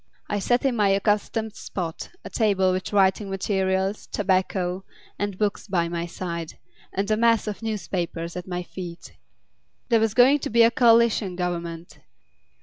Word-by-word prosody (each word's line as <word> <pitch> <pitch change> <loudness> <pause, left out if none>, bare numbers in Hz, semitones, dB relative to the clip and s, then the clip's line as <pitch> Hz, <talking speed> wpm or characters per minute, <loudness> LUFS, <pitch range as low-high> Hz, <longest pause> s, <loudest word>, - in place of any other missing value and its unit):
I 205 - 0
sat 245 +6 +1
in 265 -3 +2
my 205 -3 +3
accustomed 210 +2 0
spot, 170 -4 -5 0.2
a - - -6
table 195 -4 +2
with 185 0 -3
writing 195 0 +2
materials, 190 0 -1
tobacco, 185 -1 0 0.4
and 205 -2 -2
books 210 0 -1
by 175 -4 +1
my 170 0 -3
side, 170 -2 -5 0.3
and 200 +2 -2
a - - +4
mass 230 0 +3
of 210 0 -5
newspapers 175 -6 -3
at 180 0 -6
my 180 -1 -3
feet. 175 -1 -9 0.8
There 230 -2 +4
was 220 -1 0
going 265 +4 +6
to - - -4
be 235 +1 +5
a 230 - +5
coalition 230 -5 +4
Government. 170 -3 -4
195 Hz, 155 wpm, -24 LUFS, 180-215 Hz, 0.8 s, going